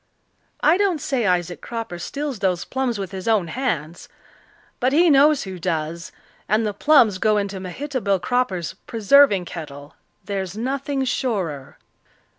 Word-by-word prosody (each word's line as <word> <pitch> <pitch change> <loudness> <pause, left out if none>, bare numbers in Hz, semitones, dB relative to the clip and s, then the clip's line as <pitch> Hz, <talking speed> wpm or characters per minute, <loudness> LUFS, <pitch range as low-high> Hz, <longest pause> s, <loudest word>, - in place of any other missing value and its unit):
I 315 +4 +4
don't 385 -5 +1
say 270 -7 -1
Isaac 175 -1 0
Cropper 230 -7 -6
steals 280 +2 -4
those 185 -3 0
plums 260 -4 -2
with 195 -2 -5
his 190 0 -7
own 210 -7 +2
hands. 170 - -3 0.7
But 255 +1 +1
he 335 +2 +5
knows 285 +1 +5
who 190 -2 -7
does 165 +2 -3 0.4
and 215 +2 +2
the 210 - -1
plums 225 -5 +4
go 215 +1 +2
into 200 -1 -2
Mehitable 200 +1 -2
Cropper's 185 -4 -1
preserving 225 -3 +4
kettle; 145 -4 -9 0.3
there's 195 -1 -4
nothing 270 +3 -2
surer." 190 - -3
210 Hz, 140 wpm, -22 LUFS, 180-265 Hz, 0.7 s, he